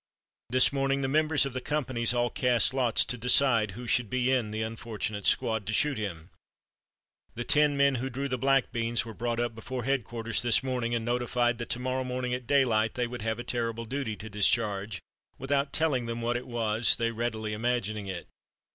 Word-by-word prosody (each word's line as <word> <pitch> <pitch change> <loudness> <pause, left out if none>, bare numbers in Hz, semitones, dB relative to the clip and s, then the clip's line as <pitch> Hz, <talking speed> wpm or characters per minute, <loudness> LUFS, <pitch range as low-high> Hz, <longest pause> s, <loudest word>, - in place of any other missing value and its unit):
This 130 +3 +4
morning 135 0 0
the 135 - 0
members 155 +1 +3
of 135 - -4
the 130 - -3
companies 130 -5 0
all 120 0 0
cast 125 -1 +2
lots 125 -4 +3
to 125 - -3
decide 120 -3 +3
who 125 - -7
should 120 -2 0
be 130 +2 +1
in 125 -5 +1
the 110 +1 -3
unfortunate 110 -3 -4
squad 110 -3 +1
to 110 - -2
shoot 145 -1 +2
him. 90 -4 -6 1.0
The 120 - -3
ten 145 +2 +3
men 140 0 +4
who 135 - -3
drew 135 +3 -3
the 125 -2 -3
black 135 0 +2
beans 115 -1 0
were 115 - -8
brought 120 +1 -2
up 120 -1 -1
before 125 +3 -6
headquarters 115 -3 0
this 120 0 +3
morning 125 -3 -1
and 115 -1 -2
notified 120 0 0
that 120 - -5
to 125 - -1
morrow 130 +1 -2
morning 125 0 -3
at 125 -1 -4
daylight 115 -6 +2
they 125 -1 0
would 120 0 -7
have 110 +1 -2
a 120 - -5
terrible 115 -1 -2
duty 125 -2 -3
to 110 - -9
discharge, 100 -2 +1 0.3
without 140 +1 -1
telling 140 -7 0
them 115 0 -4
what 120 +1 -1
it 125 - -4
was, 115 -1 +2
they 115 0 -1
readily 110 -2 -3
imagining 110 -2 -2
it. 90 -3 -6
120 Hz, 200 wpm, -28 LUFS, 110-130 Hz, 1.0 s, This